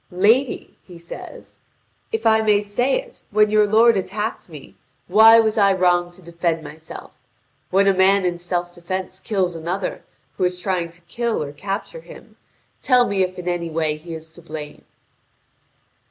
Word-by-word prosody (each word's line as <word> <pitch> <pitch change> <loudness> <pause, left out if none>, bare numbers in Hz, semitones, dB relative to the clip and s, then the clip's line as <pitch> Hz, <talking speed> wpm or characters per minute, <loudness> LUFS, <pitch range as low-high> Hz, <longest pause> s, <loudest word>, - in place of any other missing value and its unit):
"Lady," 220 +8 +1
he 180 -2 -14
says, 170 0 -11 0.5
"if 450 - -3
I 220 0 +5
may 210 -2 +3
say 245 - 0
it, - - -13
when 210 0 +3
your 210 -1 +4
lord 225 +2 +5
attacked 210 +2 -3
me, 150 -4 -12 0.3
why 220 +4 +7
was 220 0 +1
I 200 -1 +5
wrong 175 -1 +2
to 185 +1 -19
defend 170 -1 -2
myself? 160 +1 -11 0.6
When 195 +2 +3
a 195 - +4
man 190 +1 +3
in 175 -1 -1
self 175 0 -3
defence 185 +1 -5
kills 190 -4 -1
another 175 +4 -4 0.3
who - - -1
is 180 0 0
trying 180 -2 -2
to 170 +1 -17
kill 230 +3 -2
or 140 - -7
capture 200 - -5
him, - - -15 0.5
tell 250 -2 +4
me 200 -3 -1
if 185 0 -1
in 180 0 -7
any 175 -1 -2
way 155 -1 -1
he 165 +2 -9
is 160 0 -11
to 170 - -16
blame." 155 -2 -9
185 Hz, 170 wpm, -21 LUFS, 170-210 Hz, 0.6 s, why